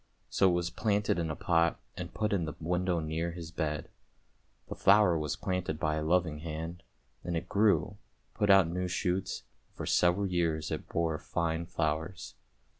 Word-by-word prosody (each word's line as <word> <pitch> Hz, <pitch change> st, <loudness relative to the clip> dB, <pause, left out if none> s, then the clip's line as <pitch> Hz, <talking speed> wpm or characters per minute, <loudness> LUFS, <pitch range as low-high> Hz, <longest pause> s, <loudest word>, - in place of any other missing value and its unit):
So 95 Hz, -, +4 dB
it -, -, +2 dB
was 85 Hz, 0 st, -1 dB
planted 105 Hz, -2 st, +1 dB
in 80 Hz, -1 st, -1 dB
a 80 Hz, -, -2 dB
pot, 85 Hz, 0 st, +2 dB, 0.2 s
and -, -, -6 dB
put 105 Hz, -1 st, -1 dB
in 90 Hz, -5 st, +1 dB
the 80 Hz, -, -5 dB
window 90 Hz, +1 st, 0 dB
near 80 Hz, +2 st, -2 dB
his 85 Hz, -2 st, -7 dB
bed. 75 Hz, -3 st, -2 dB, 0.8 s
The -, -, -5 dB
flower 105 Hz, -5 st, +5 dB
was 75 Hz, -2 st, -1 dB
planted 90 Hz, -5 st, -2 dB
by 75 Hz, -1 st, 0 dB
a -, -, -1 dB
loving 80 Hz, -2 st, +1 dB
hand, 80 Hz, +2 st, -5 dB, 0.4 s
and 85 Hz, 0 st, -2 dB
it 85 Hz, +2 st, -4 dB
grew, 105 Hz, +1 st, +2 dB, 0.4 s
put 105 Hz, -2 st, 0 dB
out 95 Hz, -3 st, +7 dB
new 90 Hz, +2 st, -2 dB
shoots, 90 Hz, +1 st, -1 dB, 0.3 s
and -, -, -33 dB
for -, -, -4 dB
several 90 Hz, +3 st, +3 dB
years 85 Hz, -4 st, 0 dB
it -, -, -4 dB
bore 80 Hz, -2 st, 0 dB
fine 85 Hz, 0 st, -2 dB
flowers. 80 Hz, +3 st, -2 dB
85 Hz, 180 wpm, -31 LUFS, 80-90 Hz, 0.8 s, out